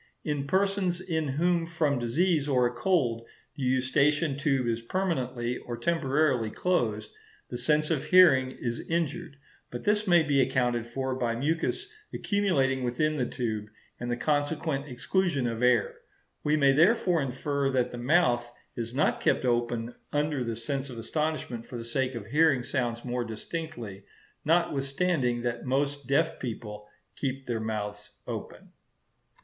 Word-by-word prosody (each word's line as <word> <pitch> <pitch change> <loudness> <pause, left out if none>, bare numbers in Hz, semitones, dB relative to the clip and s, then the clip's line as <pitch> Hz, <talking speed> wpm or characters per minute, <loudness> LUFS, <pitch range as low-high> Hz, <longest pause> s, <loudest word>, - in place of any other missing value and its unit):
In 145 -2 -2
persons 190 0 +1
in 160 -4 -2
whom 165 +4 +1
from 155 -5 0
disease 150 +5 +1
or 125 -3 +3
a 120 - 0
cold 120 -5 +1 0.3
the 145 - -8
eustachian 135 +4 +2
tube 140 -3 +1
is 115 0 -1
permanently 125 -6 -2
or 120 -1 -6
temporarily 140 -7 +1
closed, 110 -9 -1 0.4
the 120 - -3
sense 150 +5 +2
of 150 -5 0
hearing 160 -9 +6
is 120 -2 -4
injured; 165 -3 -2 0.3
but 120 - -6
this 210 0 +1
may 175 -2 +6
be 140 -3 +3
accounted 120 -2 +1
for 130 +2 -2
by 120 -2 -1
mucus 160 - -1 0.2
accumulating 140 -11 +1
within 150 +6 0
the 125 -3 0
tube, 110 -4 -3 0.3
and 120 - -4
the 120 - -1
consequent 145 0 0
exclusion 145 +2 0
of 115 -1 -2
air. 125 -3 +2 0.4
We 150 +1 +2
may 140 -2 +5
therefore 175 +2 +4
infer 140 +1 -1
that 130 -2 +1
the 120 - -6
mouth 120 -4 +2 0.2
is 115 +1 -5
not 150 - +1
kept - - +2
open 120 -1 0 0.2
under 145 -2 0
the 115 -1 -3
sense 135 +4 -3
of 125 - -8
astonishment 140 -2 -3
for 125 - -6
the 115 - -5
sake 130 +2 -1
of 115 -4 -6
hearing 140 +1 +3
sounds 120 -2 -2
more 125 0 -1
distinctly; 115 - -6 0.4
notwithstanding 140 -5 +1
that 120 -1 -2
most 140 +1 -1
deaf 160 +4 +1
people 105 -4 -6 0.3
keep 135 -1 -3
their 120 -2 -2
mouths 105 -2 -4 0.2
open. - - -7
135 Hz, 150 wpm, -28 LUFS, 120-155 Hz, 0.4 s, hearing